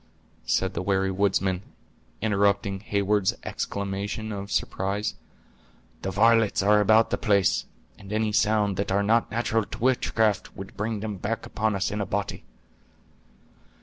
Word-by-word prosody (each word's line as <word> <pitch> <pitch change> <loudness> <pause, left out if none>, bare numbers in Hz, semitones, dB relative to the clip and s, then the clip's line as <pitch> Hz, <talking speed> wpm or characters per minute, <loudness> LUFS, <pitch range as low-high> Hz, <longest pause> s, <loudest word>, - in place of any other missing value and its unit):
said 95 -1 +1
the 85 - -3
wary 95 0 +1
woodsman, 95 -1 +1 0.6
interrupting 100 -1 +1
Heyward's 100 -1 +1
exclamation 100 +2 -4
of 100 -1 -5
surprise; 100 +3 -1 0.9
"the 95 - -3
varlets 110 +1 +3
are 105 +1 +5
about 110 +2 +4
the - - 0
place, 100 -3 +2 0.3
and 100 0 -11
any 110 0 0
sounds 105 -2 +2
that 100 - -1
are 100 +1 +2
not 115 +3 +2
natural 115 -1 0
to 105 - -8
witchcraft 110 -4 +1
would 95 0 -9
bring 105 0 -2
them 105 -2 -4
back 110 +5 -3
upon 110 -1 -1
us 95 - -1
in 105 0 -2
a 100 - -3
body." 100 0 -3
100 Hz, 145 wpm, -26 LUFS, 100-110 Hz, 0.9 s, are